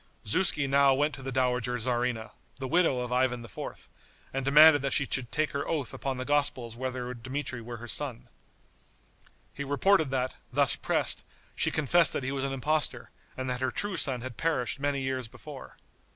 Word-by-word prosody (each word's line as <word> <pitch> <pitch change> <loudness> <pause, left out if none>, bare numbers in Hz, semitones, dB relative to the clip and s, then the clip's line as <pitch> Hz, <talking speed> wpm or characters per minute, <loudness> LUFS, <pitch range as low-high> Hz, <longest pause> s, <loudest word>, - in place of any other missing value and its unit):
Zuski 150 - +3
now 140 0 +4
went 145 +2 +1
to 135 - -8
the 135 0 -5
dowager 125 -1 0
tzarina, 120 -1 -1 0.3
the 135 -1 -4
widow 160 -5 +2
of 125 0 -5
Ivan 125 -1 +1
IV., 115 - -8 0.5
and 135 0 -2
demanded 145 +2 +7
that 140 0 -1
she 140 - +2
should 125 -4 -2
take 155 0 0
her 140 - -3
oath 145 -6 -2
upon 135 0 -3
the 130 - -4
Gospels 130 -5 0
whether 125 0 -4
Dmitri 130 +1 -5
were 120 +1 -7
her 120 +1 -9
son. 125 +1 -2 1.3
He 140 - -5
reported 155 +3 +3
that, 130 -1 -2
thus - - +4
pressed, - - 0 0.3
she - - +2
confessed 160 +2 +3
that - - -2
he 135 - -2
was 135 -1 -2
an 135 - -1
impostor, 150 +3 -1 0.3
and 130 0 -3
that 125 0 -3
her 130 - +1
true 205 +5 -1
son 130 -7 0
had 130 -2 -7
perished 155 -6 0
many 140 -1 -1
years 130 -2 -2
before. - - -11
130 Hz, 185 wpm, -29 LUFS, 125-145 Hz, 1.3 s, demanded